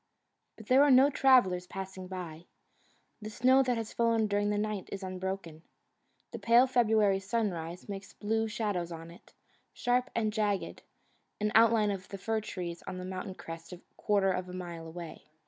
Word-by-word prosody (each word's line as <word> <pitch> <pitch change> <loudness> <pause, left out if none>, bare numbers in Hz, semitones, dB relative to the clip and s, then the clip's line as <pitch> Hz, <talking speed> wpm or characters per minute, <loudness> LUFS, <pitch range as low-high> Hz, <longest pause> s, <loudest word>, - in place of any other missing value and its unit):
But 220 - -12
there 255 +5 +5
are 290 - +5
no 270 +2 +6
travellers 195 -11 +4
passing 190 -1 -7
by. 175 -3 -7 0.8
The 215 - -6
snow 255 +5 +4
that 250 -3 0
has 225 -1 -5
fallen 230 -1 +2
during 205 0 0
the 210 - 0
night 210 -2 -3
is 195 0 -5
unbroken. 185 -3 -5 0.7
The - - -6
pale 235 +2 +5
February 220 -6 +3
sunrise 190 -5 -3
makes 200 -1 -7
blue 220 +1 -1
shadows 205 -6 -2
on 165 0 -8
it, 175 - -18 0.4
sharp 250 +1 0
and 215 -2 0
jagged, 210 -2 -1 0.6
an 210 0 0
outline 225 -2 +5
of 185 -2 -6
the 195 - -7
fir 220 +3 -1
trees 175 -4 -6
on 185 - -5
the 180 - -6
mountain 185 0 -5
crest 165 +1 -9 0.2
quarter 200 -2 +2
of, 185 0 -3
a - - -8
mile 170 -3 -7
away. 165 -2 -9
200 Hz, 170 wpm, -30 LUFS, 180-225 Hz, 0.8 s, no